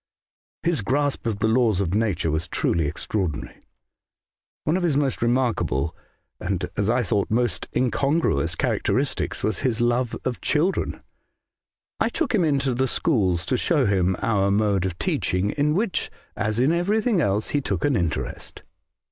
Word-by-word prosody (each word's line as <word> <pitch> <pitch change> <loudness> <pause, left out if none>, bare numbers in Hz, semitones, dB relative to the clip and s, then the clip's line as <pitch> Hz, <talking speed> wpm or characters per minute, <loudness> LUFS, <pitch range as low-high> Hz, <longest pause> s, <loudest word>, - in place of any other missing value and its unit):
His 170 -6 +1
grasp 140 +3 0
of 110 -3 -1
the 110 - +3
laws 110 -4 +3
of 95 -3 -1
nature 105 -7 0
was 80 +1 -1
truly 80 -3 0
extra 100 +7 -2
ordinary. 80 -6 -4 0.5
" - - -72
One 155 - +1
of 185 - 0
his 165 -6 +2
most 140 -3 0
remarkable, 115 - 0 0.4
and, 90 -1 -2
as 105 0 0
I 125 +2 +2
thought, 100 0 0
most 120 +2 0
incongruous, 130 - +1
characteristics - - -1
was 110 - 0
his 125 -4 0
love 120 0 +1
of 125 -2 -2
children. 165 +6 0 1.0
I - - +2
took - - -1
him 200 -5 +3
into 140 -4 +1
the 130 +2 +1
schools 95 - +1
to - - 0
show - - +2
him 95 -2 +2
our 100 -3 +2
mode 100 -2 +2
of 90 -2 -6
teaching, 90 +3 0
in 150 +1 +1
which, 205 0 -1 0.3
as 110 +1 -1
in 130 +5 +4
everthing 205 +4 +1
else, 105 -2 0
he 145 - 0
took 100 -9 -2
an 145 -2 +2
interest. 85 -6 -3
115 Hz, 165 wpm, -24 LUFS, 95-140 Hz, 1.0 s, in